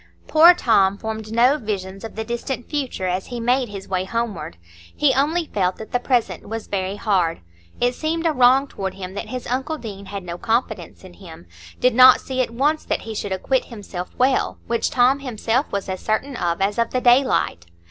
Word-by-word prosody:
Poor 335 +3 +7
Tom 200 - +3
formed 220 0 -6
no 250 +6 +4
visions 195 -4 -5
of 225 - -8
the 220 - -3
distant 240 +2 -4
future 270 -10 -3
as 185 +1 -2
he 245 -1 -5
made 245 +1 +1
his 195 -1 -8
way 185 -1 -1
homeward; 230 - -4 0.4
he 285 -3 +4
only 315 +6 +1
felt 185 -8 -1
that 220 - -10
the 245 - +1
present 245 -5 -1
was 225 0 -5
very 190 0 -3
hard. 190 -6 0 0.4
It 245 +1 +2
seemed 325 +4 -2
a 325 - +4
wrong 255 +1 +5
toward 195 -7 -5
him 190 -1 -7
that 200 - -5
his 255 -1 -6
uncle 265 +6 -2
Deane 200 -6 -8
had 200 -1 -6
no 175 0 -7
confidence 220 -7 -2
in 185 -1 -12
him,—did 90 - -4
not 255 +1 +8
see 260 -1 -2
at 250 - -1
once 285 +7 0
that - - -2
he 225 - -7
should 205 -2 -4
acquit 255 +8 0
himself 200 -6 -7
well, 260 +1 +1
which 235 0 0
Tom 255 +2 +3
himself 250 0 -1
was 200 -1 -3
as 190 -1 -4
certain 250 +5 -1
of 170 -4 -1
as 205 +3 0
of 230 - +1
the 255 - -1
daylight. 245 - +2
225 Hz, 200 wpm, -21 LUFS, 195-255 Hz, 0.4 s, not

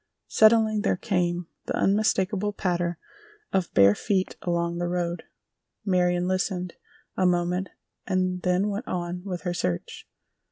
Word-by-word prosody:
Suddenly 220 -1 +5
there 205 - +1
came 175 -4 0 0.2
the - - -1
unmistakable 205 0 +1
patter 175 -3 -1 0.6
of 190 -2 0
bare 100 0 +7
feet 190 - -1
along 170 -1 -1
the 175 - -1
road; 175 0 -2 0.6
Marion 180 -2 +2
listened 185 -1 -1 0.4
a 185 - +3
moment 180 +1 0 0.4
and 185 -1 0
then 180 +3 +1
went 210 +5 -4
on 175 0 -3
with 180 -3 -4
her 175 -2 -2
search. 90 - -3
180 Hz, 130 wpm, -26 LUFS, 175-195 Hz, 0.6 s, bare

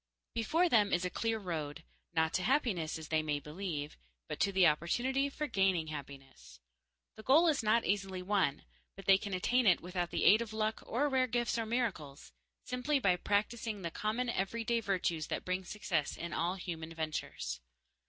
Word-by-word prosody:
Before 315 +11 +2
them 215 -9 +4
is 180 +1 +1
a 180 - -2
clear 225 -1 -1
road. 165 -5 -4 0.3
Not 160 -1 +1
to - - +1
happiness, 195 - +1
as 160 -2 -9
they 155 -1 +2
may 150 -1 -1
believe, 150 -1 -5 0.3
but - - -5
to 200 - +2
the 190 -2 +4
opportunity 245 - +2
for 300 +2 -3
gaining 190 - +1
happiness. 140 - -10 0.6
The - - -8
goal 295 +10 +5
is 300 -6 +2
not 225 +1 +3
easily 190 -2 -1
won, 185 -7 +1 0.3
but 195 - -11
they 195 0 +6
can 200 -2 -3
attain 245 +6 +2
it 180 - +6
without 180 0 -3
the - - -1
aid 215 +3 +7
of 225 -2 -5
luck 220 0 -1
or 270 +6 +1
rare 260 -2 +2
gifts 240 0 0
or 225 - -2
miracles 210 - -3 0.3
simply 250 +4 0
by 190 -8 +3
practicing 210 +2 -1
the 170 - -3
common 220 +7 -1
everyday 230 +2 0
virtues 180 -7 -1
that - - -3
bring 185 +1 -1
success 175 -6 -2
in 170 -1 -5
all 175 +4 0
human 165 -3 -6
ventures. 155 - -4
195 Hz, 185 wpm, -33 LUFS, 165-230 Hz, 0.6 s, aid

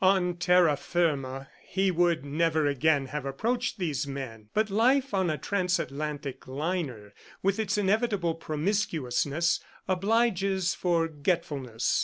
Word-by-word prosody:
On 185 -2 +4
terra 175 -4 +4
firma, 140 -5 -1 0.2
he 190 0 +1
would 170 -3 +2
never 155 +1 +1
again 145 0 +2
have 150 0 -4
approached 230 - -1
these 155 -6 -2
men; 120 -6 -7
but 215 -1 0
life 255 +5 +3
on 190 -3 +2
a 155 - -1
transatlantic 150 -6 -2
liner, 135 - -3 0.3
with 195 +2 +1
its 210 -2 0
inevitable 205 -3 +1
promiscuousness, 160 -2 0 0.3
obliges 195 -2 +1
forgetfulness. 150 -8 0
170 Hz, 115 wpm, -28 LUFS, 140-195 Hz, 0.3 s, On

